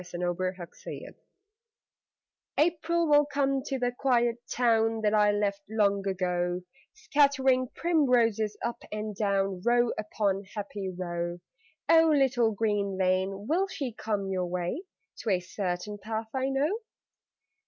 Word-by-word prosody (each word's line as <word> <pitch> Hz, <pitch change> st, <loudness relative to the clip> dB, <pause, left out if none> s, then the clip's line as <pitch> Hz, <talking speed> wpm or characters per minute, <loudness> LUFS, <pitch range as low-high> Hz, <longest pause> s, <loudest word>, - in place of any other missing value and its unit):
THE 180 Hz, -1 st, -8 dB
EMPTY 180 Hz, +1 st, -1 dB
HOUSE 175 Hz, -2 st, -9 dB, 1.4 s
April 335 Hz, +1 st, +2 dB
will 295 Hz, -1 st, +5 dB
come 275 Hz, -2 st, 0 dB
to 270 Hz, 0 st, -3 dB
the 245 Hz, -1 st, 0 dB
quiet 240 Hz, -2 st, +1 dB
town 225 Hz, -2 st, +2 dB
That 210 Hz, -1 st, +2 dB
I 210 Hz, -1 st, +5 dB
left 205 Hz, -1 st, 0 dB
long 200 Hz, -2 st, +1 dB
ago, 180 Hz, -1 st, -1 dB, 0.3 s
Scattering 270 Hz, -3 st, +2 dB
primroses 240 Hz, -10 st, +2 dB
up 235 Hz, -, -3 dB
and 215 Hz, 0 st, -4 dB
down 195 Hz, -2 st, 0 dB
Row 240 Hz, 0 st, +3 dB
upon 205 Hz, -2 st, -1 dB
happy 200 Hz, -2 st, -4 dB
row. 175 Hz, -1 st, -4 dB, 0.5 s
(Oh, 325 Hz, 0 st, +6 dB
little 265 Hz, -6 st, +3 dB
green 205 Hz, -2 st, 0 dB
lane, 190 Hz, +2 st, 0 dB
will 370 Hz, +5 st, +2 dB
she 275 Hz, -, -4 dB
come 210 Hz, -3 st, -2 dB
your 185 Hz, -1 st, -1 dB
way, 180 Hz, -, -2 dB, 0.4 s
To 225 Hz, -, -3 dB
a 185 Hz, -3 st, +3 dB
certain 185 Hz, +2 st, -4 dB
path 220 Hz, +2 st, -4 dB
I 265 Hz, 0 st, 0 dB
know?) 295 Hz, +10 st, 0 dB
215 Hz, 130 wpm, -28 LUFS, 195-260 Hz, 1.4 s, Oh